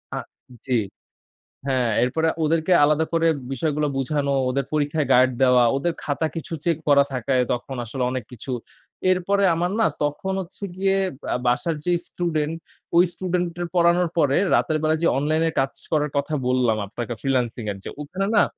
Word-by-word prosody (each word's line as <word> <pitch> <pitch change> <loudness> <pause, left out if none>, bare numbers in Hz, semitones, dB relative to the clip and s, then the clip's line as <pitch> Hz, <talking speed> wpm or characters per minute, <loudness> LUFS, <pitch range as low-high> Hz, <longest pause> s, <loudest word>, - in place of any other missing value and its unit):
আ - - -2 0.5
জি। 125 -3 +2 0.9
হ্যাঁ, 130 -3 +1
এরপরে 160 +6 +1 0.2
ওদেরকে 160 +3 +1
আলাদা 150 +2 +3
করে 165 0 +2 0.3
বিষয়গুলা 150 +2 0
বুঝানো, 140 +1 0 0.2
ওদের 135 +1 0
পরীক্ষায় 150 0 0
গার্ড 130 +1 +5
দেওয়া, 125 -2 +5
ওদের 170 +5 0
খাতা 145 +2 -1
কিছু 165 - -6
চেক 170 -2 +2
করা 140 -1 +6
থাকে 130 +1 -1 0.2
তখন 125 +2 -4
আসলে, 125 +3 -4
অনেক 130 -2 -3
কিছু। 125 +2 -7 0.6
এরপরে 195 +2 +2
আমার 175 +2 0
না, 225 - +5 0.2
তখন 170 +7 -2
হচ্ছে 190 +2 -8
গিয়ে 195 0 +2 0.3
বা - - -3
বাসার 140 +7 +1
যে 180 - +1 0.2
স্টুডেন্ট, 160 -2 -2 0.4
ওই 175 - +7
স্টুডেন্ট 180 -1 -1 0.2
এর - - -1
পড়ানোর 175 0 +4
পরে 145 -3 +3 0.2
রাতের 155 - +2
বেলা 155 0 +2
যে, - - +3
অনলাইন 155 +3 +1
এ - - 0
কাজ 135 0 -1 0.2
করার 150 -2 +1
কথা 140 +2 0
বললাম 125 -3 +2
আপনাকে 120 +4 -5
ফ্রিল্যান্সিং 125 -3 -1
এর। - - -9
যে - - -5
ওখানে 185 +7 -3
না? - - +6
150 Hz, 170 wpm, -23 LUFS, 130-170 Hz, 0.9 s, ওই